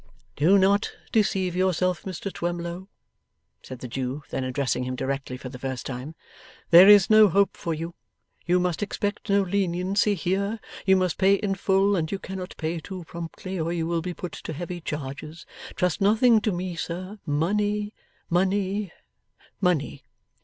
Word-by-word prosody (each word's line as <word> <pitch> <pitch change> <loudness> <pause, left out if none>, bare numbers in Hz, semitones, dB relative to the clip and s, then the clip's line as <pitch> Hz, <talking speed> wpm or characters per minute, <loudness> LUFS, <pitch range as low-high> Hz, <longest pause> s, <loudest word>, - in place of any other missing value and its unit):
'Do 175 +8 +5
not 200 +2 +2 0.2
deceive 190 -4 +1
yourself 185 -1 +1
Mr 190 +1 -5
Twemlow,' 175 +1 -4 0.7
said 130 -2 -10
the 125 - -5
Jew, 130 +3 -4
then 130 - -2
addressing 130 -1 -1
him 130 0 -3
directly 135 -1 -3
for 130 - -8
the 125 0 -9
first 130 -2 -4
time. 135 +5 -6 0.6
'There 180 +4 +10
is 205 +1 +7
no 215 -1 +8
hope 200 +3 +2
for 170 - -4
you. 165 +2 -5 0.5
You 180 +1 +2
must 180 0 -1
expect 205 +1 -3
no 200 0 +4
leniency 195 +2 +1
here. 200 +5 -1 0.3
You 190 - +6
must 185 -2 0
pay 195 +1 +5
in 200 0 -1
full, 195 +1 +2
and 160 -3 -1
you 195 - -1
cannot 190 -1 -7
pay 165 +1 -2
too 185 +2 -8
promptly, 170 +3 -6
or 165 +1 -1
you 170 -2 -1
will 170 0 -1
be 180 +1 -5
put 180 -3 -6
to 160 - -7
heavy 175 +3 -6
charges. 150 +2 -6 0.3
Trust 180 +2 0
nothing 220 +3 +5
to 215 - 0
me, 180 -1 -3
sir. 185 +5 -5
Money, 205 +7 0 0.3
money, 195 +2 0 0.7
money. 175 -7 0
180 Hz, 165 wpm, -25 LUFS, 160-195 Hz, 0.7 s, There